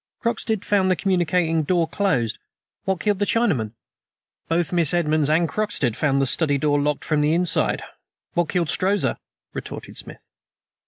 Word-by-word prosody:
"Croxted 225 -3 -1
found 195 -2 +2
the 185 - +3
communicating 175 -2 +1
door 170 +2 +1
closed. 160 - 0 0.5
What 190 -2 0
killed 205 -2 +1
the 205 - +2
Chinaman?" 145 - +1 0.7
"Both 165 0 0
Miss 170 -2 +3
Edmonds 155 -3 +1
and 165 +2 +3
Croxted 185 - -1
found 140 -2 +1
the 135 - +2
study 145 +2 +1
door 145 0 +1
locked 150 0 -1
from 155 -2 +1
the 150 +2 +2
inside. 175 0 +1 0.5
What 175 -2 +1
killed 170 -4 0
Strozza?" 200 +2 +1 0.3
retorted - - -7
Smith. - - -9
170 Hz, 155 wpm, -23 LUFS, 150-190 Hz, 0.7 s, the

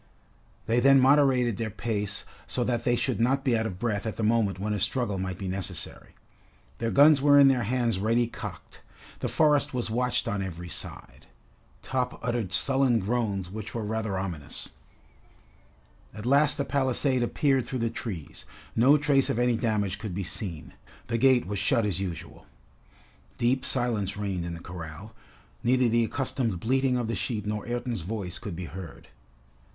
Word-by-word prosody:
They 115 +2 +2
then 135 +2 +6
moderated 130 -4 +4
their 115 -1 -2
pace 105 -1 -3 0.2
so 125 - -1
that 120 -1 -1
they 120 - +3
should 125 0 -1
not 135 +4 +2
be 130 -4 +2
out 110 0 0
of 90 - -6
breath 105 0 -2
at 110 - -3
the 115 - -3
moment 105 -4 +2
when 105 +2 -2
a 105 - -2
struggle 105 0 0
might 90 -1 -3
be 95 - -5
necessary. 95 0 -4 0.6
Their 115 - -1
guns 145 +2 +6
were 145 0 +6
in 140 -1 +8
their 130 -2 +2
hands 115 -2 0
ready 115 +4 +2
cocked. 120 - -9 0.4
The - - -2
forest 150 -4 +2
was 120 -3 -1
watched 125 +2 0
on 100 -1 -1
every 90 -2 -6
side. - - -8 0.6
Top 125 -1 -2
uttered 120 -5 -1
sullen 135 -3 +3
groans 100 -4 -1
which 110 +2 -7
were 115 - -2
rather 110 -2 -2
ominous. 90 -6 -5 1.5
At 105 0 -7
last 145 +3 +4
the 140 - -1
palisade 130 -1 +1
appeared 130 +1 +1
through 130 - -3
the 115 - -1
trees. 95 -10 -7 0.3
No 130 +6 +6
trace 145 -2 +2
of - - 0
any 120 0 +2
damage 105 -4 -1
could 105 -5 -5
be 100 - -2
seen. 85 -3 -5 0.4
The 115 0 0
gate 130 -1 +4
was 100 +1 -3
shut 115 +2 +2
as 95 -4 -1
usual. 90 -4 -6 0.9
Deep 125 +2 +1
silence 110 -6 +1
reigned 95 -4 -3
in 85 - -5
the 85 - -10
corral. 90 +5 -9 0.5
Neither 125 +1 +3
the 115 0 +3
accustomed 115 -5 -2
bleating 130 +4 +1
of 120 -2 -2
the 115 - -2
sheep 105 +1 -3
nor 105 +2 -3
Ayrton's 120 -3 -3
voice 95 -1 -5
could 100 -5 -6
be 90 +1 -5
heard. 85 -2 -9
115 Hz, 175 wpm, -27 LUFS, 100-125 Hz, 1.5 s, in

